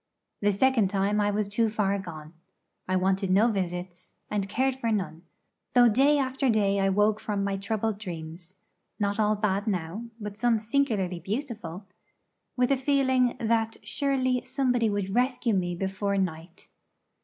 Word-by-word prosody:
The 205 0 +3
second 230 0 +3
time 200 +2 +1
I 205 - +2
was 205 0 0
too 220 +2 +1
far 200 -2 0
gone; 160 -4 -9 0.5
I 185 - 0
wanted 190 +1 +1
no 205 +6 +4
visits, 180 -3 -4 0.2
and 200 -2 -1
cared 260 +4 +1
for 230 -3 -1
none, 185 -6 -2 0.5
though 245 -1 +7
day 275 +7 +4
after 265 -1 0
day 200 -3 +2
I 195 0 +2
woke 210 +2 +2
from 205 -2 -2
my 200 0 -1
troubled 210 +1 -2
dreams 170 -1 -7 0.4
not 205 0 0
all 215 0 +3
bad 205 0 -1
now, 185 +3 -2
but 210 -1 -7
some 240 -2 +3
singularly 215 -6 0
beautiful 205 - -5 0.7
with 250 +1 +2
a 275 - +4
feeling 260 -2 +2
that 225 -1 0
surely 255 +3 0
somebody 250 -4 +1
would 200 -2 -2
rescue 245 -1 +1
me 175 -2 0
before 195 +2 -2
night. 170 -2 -4
210 Hz, 155 wpm, -27 LUFS, 190-235 Hz, 0.7 s, though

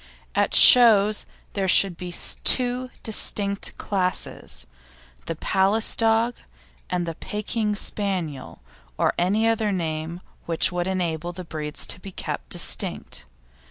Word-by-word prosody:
At - - 0
shows 215 -4 +7 0.3
there 195 -2 -2
should 185 -1 +6
be 180 +1 -8 0.3
two 250 0 +1
distinct 200 -2 -2
classes; 185 -3 -5 0.6
the - - -4
Palace 195 +4 +1
dog 225 +1 +1 0.6
and 180 -1 -2
the 165 - -5
Pekin 210 +4 -4
Spaniel, 180 - -2 0.3
or - - 0
any 205 +6 0
other 225 -2 -1
name 165 -1 -5 0.3
which 165 +2 0
would 175 0 -3
enable 175 -2 -3
the 180 0 -9
breeds 155 -2 -5
to - - -1
be 195 +1 -11
kept - - -7
distinct. - - -4
190 Hz, 125 wpm, -22 LUFS, 175-215 Hz, 0.6 s, shows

